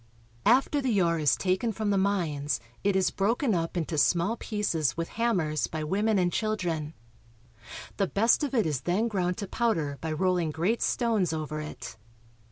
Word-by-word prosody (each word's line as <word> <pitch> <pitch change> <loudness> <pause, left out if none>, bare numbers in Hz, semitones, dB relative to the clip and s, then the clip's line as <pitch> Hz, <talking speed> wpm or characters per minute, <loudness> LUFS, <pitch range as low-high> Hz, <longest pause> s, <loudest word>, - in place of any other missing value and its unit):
After 270 +5 +4
the 240 -7 +1
ore 170 -2 +2
is 150 -3 +3
taken 190 +5 0
from 215 0 -2
the - - +2
mines 155 - 0 0.2
it 200 -1 +2
is 190 -1 +2
broken 225 +4 +1
up 165 0 -2
into 160 -2 -1
small 175 +8 +2
pieces 205 - -1
with 165 0 -3
hammers 180 -10 0
by 155 -1 -4
women 205 +7 +1
and 180 -2 +1
children. 175 -8 -2 1.0
The 195 - +1
best 225 - +3
of 280 -2 -2
it 225 - +3
is 150 -5 -1
then 195 +7 0
ground 180 -5 -1
to 200 - -4
powder 165 -11 -1
by 160 - -3
rolling 180 0 +1
great 175 +10 0
stones 220 -8 +1
over 155 -1 -4
it. 120 -6 -8
185 Hz, 175 wpm, -28 LUFS, 160-215 Hz, 1.0 s, After